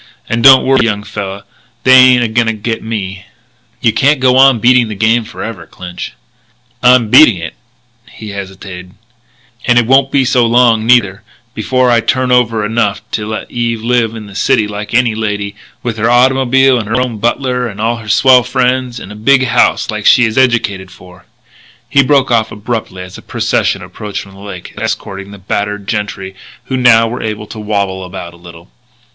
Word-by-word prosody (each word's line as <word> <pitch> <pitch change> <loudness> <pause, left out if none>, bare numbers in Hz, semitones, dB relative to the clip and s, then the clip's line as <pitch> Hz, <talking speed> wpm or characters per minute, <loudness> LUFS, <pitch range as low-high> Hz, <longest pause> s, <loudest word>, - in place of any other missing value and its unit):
And 115 0 -2
don't 135 -1 +7
worry, 135 0 +3
young 105 -2 -2
fella; 100 -1 -6 0.4
they 130 - +5
ain't 130 -1 +6
a - - 0
going 115 +1 0
to 115 - 0
get 110 +1 -4
me." 100 -4 -6 0.5
"You 115 - +2
can't 140 +1 +2
go 130 -1 +3
on 135 -1 +5
beating 120 +1 +3
the 105 - -6
game 115 +3 +1
forever, 105 -4 -8
Clinch." 90 -6 -9 0.7
"I'm 125 -3 +4
beating 120 -9 +7
it 85 -1 -7 0.3
" 120 -1 -41
he 110 - -8
hesitated 95 -2 -9 0.7
"and 120 -1 +3
it 120 - +3
won't 135 +2 +3
be 135 -2 +2
so 125 -1 +2
long, 115 -2 +2
neither, 105 -6 +2 0.3
before 125 +3 0
I 120 - +3
turn 130 +2 -1
over 115 -3 +1
enough 105 -3 -1
to 105 -1 -3
let 110 0 -6
Eve 115 -2 -3
live 115 -2 0
in 110 -1 -8
the 100 - -13
city 110 +1 +1
like 105 +1 -6
any 120 -2 +2
lady, 105 -2 -3 0.3
with 120 -3 -3
her 115 +2 0
autymobile 130 +1 +3
and 110 - -5
her 120 - 0
own 125 -4 -3
butler 125 +2 -1
and 105 -2 -9
all 115 +2 -1
her 110 -2 -10
swell 130 +3 +5
friends, 125 0 -1
in 95 - -10
a - - -9
big 130 +5 +2
house 120 -1 +1
like 105 -1 -3
she 125 - +5
is 110 -1 -3
educated 115 -7 0
for 90 -1 -17 0.3
" - - -29
He 140 - +5
broke 135 -1 +1
off 110 -2 +1
abruptly 105 -3 -5
as 90 0 -11
a - - -14
procession - - -1
approached 105 -2 -7
from 95 - -16
the 95 - -15
lake, 100 -3 -9
escorting 100 -3 -5
the 100 - -11
battered 100 +1 -4
gentry 100 -2 -4 0.3
who 130 - -4
now 120 -3 +4
were 120 +2 -5
able 105 -1 -5
to 110 - -10
wabble 100 -3 -3
about 90 -2 -8
a - - -16
little. 85 0 -15
115 Hz, 195 wpm, -13 LUFS, 100-125 Hz, 0.7 s, don't